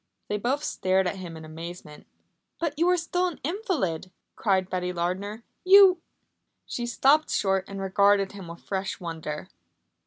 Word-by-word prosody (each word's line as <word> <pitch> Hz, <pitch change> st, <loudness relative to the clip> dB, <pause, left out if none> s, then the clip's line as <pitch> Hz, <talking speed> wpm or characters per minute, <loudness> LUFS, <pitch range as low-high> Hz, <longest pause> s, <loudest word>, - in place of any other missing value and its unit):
They 210 Hz, -, 0 dB
both 265 Hz, +7 st, 0 dB
stared 190 Hz, -5 st, +1 dB
at 180 Hz, +2 st, -2 dB
him 175 Hz, -3 st, -7 dB
in 160 Hz, -, -10 dB
amazement. 160 Hz, -1 st, -9 dB, 0.5 s
"But 330 Hz, -3 st, -1 dB
you 340 Hz, +2 st, +4 dB
are 360 Hz, -, +4 dB
still 355 Hz, +2 st, 0 dB
an 345 Hz, -, -6 dB
invalid," 295 Hz, -, -2 dB, 0.3 s
cried 190 Hz, -3 st, +1 dB
Betty 180 Hz, -1 st, -2 dB
Lardner. 190 Hz, +6 st, -3 dB, 0.2 s
"You 380 Hz, -2 st, +7 dB, 0.3 s
" -, -, -52 dB
She 240 Hz, -1 st, -4 dB
stopped 280 Hz, +6 st, +3 dB
short 190 Hz, -1 st, +1 dB
and 195 Hz, 0 st, -7 dB
regarded 195 Hz, +1 st, +3 dB
him 195 Hz, -3 st, -9 dB
with 170 Hz, 0 st, -10 dB
fresh 195 Hz, -1 st, -3 dB
wonder. 160 Hz, -3 st, -5 dB
195 Hz, 160 wpm, -26 LUFS, 180-290 Hz, 0.5 s, You